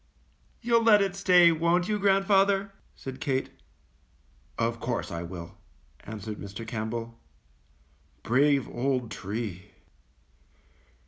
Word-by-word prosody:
"You^ll 235 0 +3
let 220 -2 +6
it 195 -1 -2
stay, 180 -3 +6
won't 170 +2 +1
you, 210 -1 -1
grandfather?" 195 0 +3 0.2
said 130 -1 -8
Kate. 135 -1 -1 1.1
^^Of 115 0 -1
course 120 -4 -3
I 85 0 -4
will," 85 -1 -9 0.5
answered 105 0 -7
Mr. 100 +3 -8
Campbell, 115 0 -5 1.0
^^brave 140 +2 +2
old 125 -1 -2
tree!" 100 -2 -6
130 Hz, 105 wpm, -27 LUFS, -, 1.1 s, let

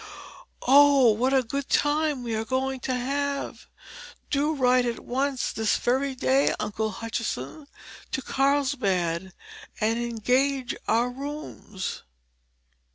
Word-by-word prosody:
Oh, 275 -2 +6
what 245 +5 +1
a 265 -1 +3
good 275 +3 -4
time 295 -2 +1
we 235 -2 -3
are 220 0 -1
going 260 +3 -1
to 255 - -2
have! 280 +3 -3 0.6
Do 295 +2 +1
write 250 -2 +3
at 235 - -3
once, 265 +1 -1
this 220 -1 +1
very 265 +2 0
day, 265 +2 +2
Uncle 215 +1 -2
Hutchinson, 230 - -5 0.4
to 265 - -2
Carlsbad 205 - 0 0.5
and 225 +2 +1
engage 250 +3 0
our 235 +3 +2
rooms." 275 -7 -6
255 Hz, 115 wpm, -26 LUFS, 225-280 Hz, 0.6 s, Oh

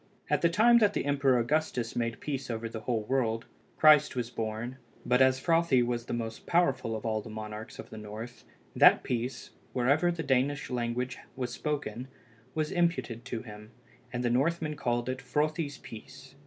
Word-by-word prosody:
At - - +3
the 170 - +4
time 235 +7 +5
that 205 -2 +3
the - - -1
Emperor 140 -2 +3
Augustus 125 -2 -1
made 115 -1 -2
peace 135 -3 -4
over 115 0 -3
the 115 0 -6
whole 110 0 -1
world, 115 -2 0 0.3
Christ 150 -2 +6
was 120 -1 -3
born, 115 +3 -4 0.3
but 125 +1 +3
as 130 0 +5
Frothi 165 -5 +3
was 120 -1 -2
the - - -5
most 115 -1 -5
powerful 135 -10 +2
of 110 - -6
all 110 -1 0
the 110 - -10
monarchs 110 +1 -7
of - - -10
the 110 - -7
north, 110 +3 -8 0.3
that - - +7
peace, 125 +2 -3 0.2
wherever 140 +8 +3
the 165 -1 -4
Danish 140 +1 0
language 125 +1 -2 0.2
was 125 -2 -3
spoken, 135 -5 -3 0.5
was 155 -1 -1
imputed 170 -9 0
to 120 -3 -4
him, 105 -2 -11 0.4
and 120 0 -2
the 120 - +2
Northmen 155 +4 +1
called 120 -3 -1
it 130 0 -2
Frothi's 150 -1 -1
peace. 130 +4 -12
125 Hz, 180 wpm, -30 LUFS, 115-150 Hz, 0.5 s, that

